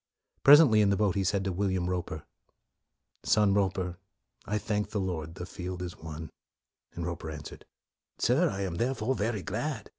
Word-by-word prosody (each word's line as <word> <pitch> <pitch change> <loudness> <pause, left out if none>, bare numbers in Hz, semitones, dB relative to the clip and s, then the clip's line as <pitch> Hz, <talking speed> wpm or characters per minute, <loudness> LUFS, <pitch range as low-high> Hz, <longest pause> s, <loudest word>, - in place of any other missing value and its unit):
Presently, 140 -7 +8
in 105 - +4
the 100 - +3
boat, 100 -2 +2
he 100 - 0
said 100 +1 +1
to 95 - -1
Will 100 +2 0
iam 90 -1 -1
Roper, 90 -4 -3 0.5
" - - -49
Son 105 -2 +4
Roper, 95 -3 0 0.5
I 105 - 0
thank 105 0 -2
the 105 - -2
Lord, 85 -4 -3
the 90 - -6
field 90 0 -6
is 90 -1 -6
won.' 80 0 -8 0.6
1 85 - -4
Roper 85 -2 -5
answered, 75 -1 -9 0.3
" - - -59
Sir, 150 +9 +3
I 100 - -4
am 90 -3 -3
thereof 125 +2 -1
very 105 -2 -1
glad." - - -3
95 Hz, 185 wpm, -29 LUFS, 90-105 Hz, 0.6 s, Presently